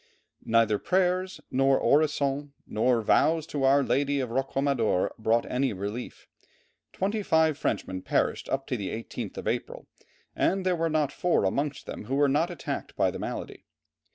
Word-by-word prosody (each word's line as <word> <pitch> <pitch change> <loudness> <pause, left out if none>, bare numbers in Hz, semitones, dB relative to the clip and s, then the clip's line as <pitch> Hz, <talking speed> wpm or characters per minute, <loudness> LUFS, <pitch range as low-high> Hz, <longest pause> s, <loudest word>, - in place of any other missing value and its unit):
Neither 115 -2 +3
prayers, 185 +1 0
nor 135 +1 +3
orisons, 145 -1 +1 0.2
nor 115 +1 +1
vows 160 +8 +3
to 150 -3 -4
our 140 +1 +5
Lady 140 +1 +1
of 125 -3 -3
Roquamadour 135 -6 0
brought 115 +2 +2
any 130 -1 0
relief. 100 +5 -6 0.7
Twenty 205 +3 -1
five 160 -5 +3
Frenchmen 95 -8 -2
perished - - -1
up 135 0 -1
to 125 - -2
the 100 -3 -4
18th 115 +1 -6
of - - -5
April, - - -3 0.5
and 190 0 +1
there 185 -1 +2
were 165 0 0
not 155 -3 +1
four 180 -9 +1
amongst 140 +8 -1
them - - -7
who 130 +5 -2
were 145 0 +4
not 150 +5 +2
attacked 175 - -5
by - - +2
the - - -7
malady. - - -6
140 Hz, 160 wpm, -27 LUFS, 120-160 Hz, 0.7 s, our